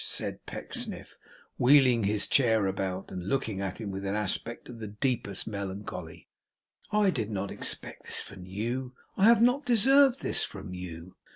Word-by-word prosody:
said -, -, -3 dB
Pecksniff, -, -, -5 dB, 0.4 s
wheeling 125 Hz, -4 st, +5 dB
his 105 Hz, 0 st, +2 dB
chair 110 Hz, -6 st, +3 dB
about, 95 Hz, 0 st, -3 dB
and 90 Hz, 0 st, -5 dB
looking 110 Hz, -8 st, -1 dB
at 95 Hz, +1 st, -4 dB
him 105 Hz, -3 st, -4 dB
with 95 Hz, 0 st, -5 dB
an 100 Hz, +1 st, -1 dB
aspect 105 Hz, +3 st, -2 dB
of 120 Hz, -2 st, -10 dB
the 110 Hz, -, -5 dB
deepest 105 Hz, -2 st, -1 dB
melancholy, 100 Hz, -5 st, -6 dB, 0.6 s
'I 210 Hz, -2 st, +3 dB
did 115 Hz, -, -2 dB
not 100 Hz, -2 st, -3 dB
expect -, -, -3 dB
this -, -, 0 dB
from 95 Hz, -2 st, -8 dB
you. 120 Hz, +6 st, -3 dB, 0.2 s
I 195 Hz, -, +3 dB
have 230 Hz, 0 st, +6 dB
not 250 Hz, +4 st, +3 dB
deserved 270 Hz, +2 st, +5 dB
this -, -, +2 dB
from 95 Hz, -2 st, -7 dB
you! 90 Hz, -1 st, -8 dB
105 Hz, 165 wpm, -29 LUFS, 95-135 Hz, 0.6 s, have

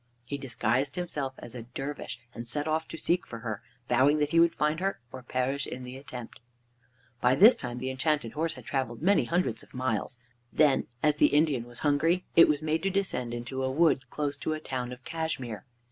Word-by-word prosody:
He 140 Hz, +3 st, -4 dB
disguised 130 Hz, +2 st, 0 dB
himself 150 Hz, -7 st, -3 dB
as 115 Hz, -, -6 dB
a 125 Hz, -, -5 dB
dervish 130 Hz, 0 st, -6 dB
and 115 Hz, 0 st, -7 dB
set 145 Hz, +5 st, -2 dB
off 160 Hz, +1 st, 0 dB
to 165 Hz, -, -7 dB
seek 175 Hz, +2 st, 0 dB
for 115 Hz, -, -7 dB
her, 110 Hz, -4 st, -4 dB, 0.3 s
vowing 130 Hz, +5 st, +4 dB
that 150 Hz, 0 st, 0 dB
he 165 Hz, -, +4 dB
would 170 Hz, 0 st, +5 dB
find 150 Hz, +2 st, +1 dB
her, 195 Hz, -4 st, -1 dB
or 130 Hz, -, -8 dB
perish 130 Hz, +2 st, -1 dB
in 130 Hz, -, -6 dB
the 125 Hz, +1 st, -8 dB
attempt. 125 Hz, -3 st, -9 dB, 0.8 s
By 125 Hz, +1 st, +4 dB
this 215 Hz, -, +9 dB
time 125 Hz, -2 st, -5 dB
the 130 Hz, +1 st, -3 dB
Enchanted 130 Hz, -3 st, 0 dB
Horse 165 Hz, +4 st, -1 dB
had -, -, -12 dB
traveled 130 Hz, -1 st, -2 dB
many 195 Hz, -8 st, +4 dB
hundreds 170 Hz, -7 st, 0 dB
of -, -, -16 dB
miles. 125 Hz, -1 st, -1 dB, 0.3 s
Then, 150 Hz, -3 st, +3 dB, 0.2 s
as 150 Hz, -1 st, +3 dB
the -, -, +6 dB
Indian 145 Hz, -5 st, +2 dB
was 120 Hz, -1 st, -10 dB
hungry, 165 Hz, +5 st, +2 dB
it 165 Hz, -, +9 dB
was 150 Hz, 0 st, +1 dB
made 160 Hz, +1 st, 0 dB
to 195 Hz, -, +1 dB
descend 185 Hz, -11 st, -1 dB
into 120 Hz, +3 st, -4 dB
a 130 Hz, -, +1 dB
wood 145 Hz, -1 st, +2 dB
close 145 Hz, -1 st, -2 dB
to 155 Hz, -, -2 dB
a 155 Hz, -, -3 dB
town 125 Hz, -4 st, -4 dB
of 125 Hz, 0 st, -9 dB
Cashmere. 145 Hz, -10 st, -3 dB
140 Hz, 210 wpm, -29 LUFS, 125-155 Hz, 0.8 s, this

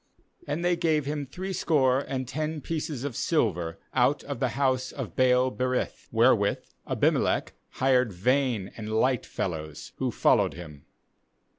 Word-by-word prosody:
4And 155 Hz, +4 st, -2 dB
they 175 Hz, 0 st, +3 dB
gave 160 Hz, -4 st, +1 dB
him 145 Hz, -1 st, -3 dB
threescore 150 Hz, -6 st, +1 dB
and 130 Hz, -2 st, -4 dB
ten 155 Hz, +4 st, -3 dB
pieces 150 Hz, -3 st, -4 dB
of 140 Hz, -5 st, -4 dB
silver 90 Hz, -, 0 dB, 0.2 s
out 130 Hz, +3 st, +2 dB
of 140 Hz, -3 st, -5 dB
the 130 Hz, -, +2 dB
house 130 Hz, -2 st, +1 dB
of 120 Hz, -, -6 dB
Baal 130 Hz, 0 st, +3 dB
berith, 125 Hz, 0 st, -2 dB
where 120 Hz, +3 st, +5 dB
with 100 Hz, -2 st, -2 dB, 0.2 s
Abimelech -, -, +1 dB, 0.2 s
hired 130 Hz, -3 st, +2 dB
vain 120 Hz, +1 st, 0 dB
and 110 Hz, -1 st, -6 dB
light 125 Hz, +2 st, +1 dB
fellows, 80 Hz, -4 st, -5 dB
who -, -, -1 dB
followed -, -, +2 dB
him. 75 Hz, -5 st, -10 dB
130 Hz, 145 wpm, -27 LUFS, 110-145 Hz, 0.2 s, where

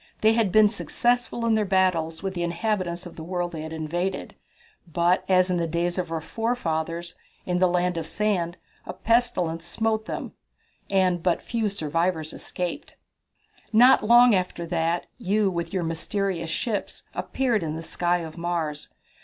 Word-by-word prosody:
They 220 Hz, +1 st, +5 dB
had 225 Hz, -4 st, +2 dB
been 215 Hz, +1 st, +7 dB
successful 240 Hz, +2 st, 0 dB
in 230 Hz, -, +3 dB
their 215 Hz, -1 st, +3 dB
battles 185 Hz, -4 st, +1 dB
with 190 Hz, -1 st, -2 dB
the 175 Hz, -, -3 dB
inhabitants 175 Hz, 0 st, -1 dB
of 175 Hz, -, -10 dB
the 160 Hz, -, -6 dB
world 175 Hz, 0 st, -2 dB
they 160 Hz, -2 st, -6 dB
had 160 Hz, 0 st, -6 dB
invaded, 170 Hz, +4 st, -3 dB, 0.6 s
but 175 Hz, +2 st, +2 dB
as 185 Hz, 0 st, +4 dB
in 180 Hz, -, +1 dB
the 170 Hz, -1 st, 0 dB
days 175 Hz, +2 st, -1 dB
of 175 Hz, -2 st, -3 dB
our 165 Hz, -, -1 dB
forefathers, 170 Hz, -6 st, -2 dB, 0.3 s
in 180 Hz, 0 st, 0 dB
the 185 Hz, -, +5 dB
Land 180 Hz, 0 st, +1 dB
of 160 Hz, -, -5 dB
Sand, 180 Hz, -3 st, 0 dB, 0.3 s
a -, -, -4 dB
pestilence 180 Hz, -8 st, +1 dB
smote 220 Hz, +5 st, -1 dB
them, -, -, -5 dB, 0.6 s
and 185 Hz, -3 st, +2 dB
but 175 Hz, -1 st, +1 dB
few 225 Hz, -3 st, -1 dB
survivors 165 Hz, -2 st, -1 dB
escaped." 180 Hz, -1 st, -5 dB, 0.8 s
"Not 245 Hz, +3 st, +6 dB
long 240 Hz, +2 st, +7 dB
after 180 Hz, -2 st, -1 dB
that, 170 Hz, 0 st, 0 dB
you, 205 Hz, -2 st, +1 dB
with 170 Hz, -1 st, -3 dB
your 185 Hz, -3 st, -1 dB
mysterious 165 Hz, +1 st, -2 dB
ships, 215 Hz, +5 st, -3 dB
appeared 245 Hz, -6 st, 0 dB
in 155 Hz, -2 st, -3 dB
the 165 Hz, -, -6 dB
sky 175 Hz, +1 st, 0 dB
of 160 Hz, 0 st, -8 dB
Mars. 165 Hz, -4 st, -2 dB
180 Hz, 165 wpm, -25 LUFS, 165-210 Hz, 0.8 s, been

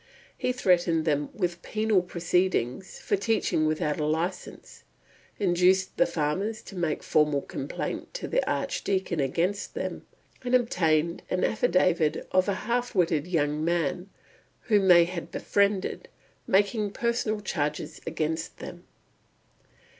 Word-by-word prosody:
He 250 Hz, -, -1 dB
threatened 175 Hz, -8 st, +2 dB
them 145 Hz, -2 st, 0 dB
with 175 Hz, -3 st, -2 dB
penal 215 Hz, -2 st, +1 dB
proceedings 180 Hz, -3 st, -1 dB
for -, -, 0 dB
teaching 195 Hz, -6 st, +1 dB
without 155 Hz, -1 st, -1 dB
a 150 Hz, -, 0 dB
license, 165 Hz, +4 st, -3 dB, 0.6 s
induced 185 Hz, 0 st, +2 dB
the 265 Hz, -, +3 dB
farmers 190 Hz, -, -2 dB
to 195 Hz, -, -11 dB
make 170 Hz, -4 st, -1 dB
formal 150 Hz, -2 st, +2 dB
complaint 135 Hz, -, -5 dB
to -, -, -4 dB
the -, -, +1 dB
Archdeacon 190 Hz, -, -1 dB
against 170 Hz, +9 st, -1 dB
them, -, -, -4 dB, 0.4 s
and 250 Hz, 0 st, +2 dB
obtained 170 Hz, -9 st, +1 dB
an 185 Hz, -, 0 dB
affidavit 170 Hz, -6 st, +2 dB
from 185 Hz, -, +4 dB
a 200 Hz, -, +1 dB
half 240 Hz, +3 st, -2 dB
witted 165 Hz, -4 st, +2 dB
young 150 Hz, -3 st, 0 dB
man, 170 Hz, +2 st, -1 dB, 0.5 s
whom 205 Hz, -4 st, +2 dB
they 175 Hz, -2 st, +8 dB
had 170 Hz, -1 st, -6 dB
befriended, 200 Hz, +2 st, 0 dB, 0.4 s
making 205 Hz, +1 st, +2 dB
personal 235 Hz, -2 st, -1 dB
charges 150 Hz, -7 st, -3 dB
against 160 Hz, +1 st, -2 dB
them. -, -, -9 dB
180 Hz, 125 wpm, -27 LUFS, 160-200 Hz, 0.6 s, they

